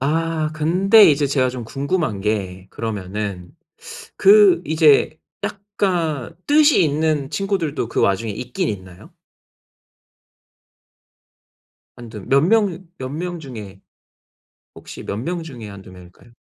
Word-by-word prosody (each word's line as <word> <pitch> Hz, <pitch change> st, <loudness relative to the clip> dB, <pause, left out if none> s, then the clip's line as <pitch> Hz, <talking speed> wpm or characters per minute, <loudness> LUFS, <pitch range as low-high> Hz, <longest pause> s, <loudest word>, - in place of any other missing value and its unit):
아 160 Hz, +2 st, -1 dB
근데 185 Hz, +8 st, +5 dB
이제 145 Hz, 0 st, +1 dB
제가 135 Hz, -2 st, +1 dB
좀 125 Hz, -2 st, -6 dB
궁금한 140 Hz, -, -2 dB
게 95 Hz, -3 st, -3 dB
그러면은 100 Hz, -4 st, -5 dB, 0.7 s
그 195 Hz, -3 st, +6 dB
이제 155 Hz, 0 st, +3 dB, 0.3 s
약간 180 Hz, -, -2 dB
뜻이 295 Hz, -, +5 dB
있는 150 Hz, -2 st, 0 dB
친구들도 165 Hz, -, -2 dB
그 -, -, -1 dB
와중에 105 Hz, +3 st, +1 dB
있긴 125 Hz, +4 st, -3 dB
있나요? 95 Hz, -3 st, -9 dB, 2.9 s
1-2 115 Hz, -3 st, -10 dB
몇 135 Hz, +1 st, +4 dB
명, 190 Hz, 0 st, +1 dB
몇 130 Hz, -, -5 dB
명 175 Hz, +4 st, -5 dB
중에 110 Hz, -10 st, -10 dB, 0.9 s
혹시 -, -, -11 dB
몇 100 Hz, -, -5 dB
명 170 Hz, +8 st, -4 dB
중에 125 Hz, -9 st, -9 dB
1-2 100 Hz, -2 st, -12 dB
명일까요? 90 Hz, +5 st, -16 dB
145 Hz, 195 characters per minute, -20 LUFS, 110-170 Hz, 2.9 s, 그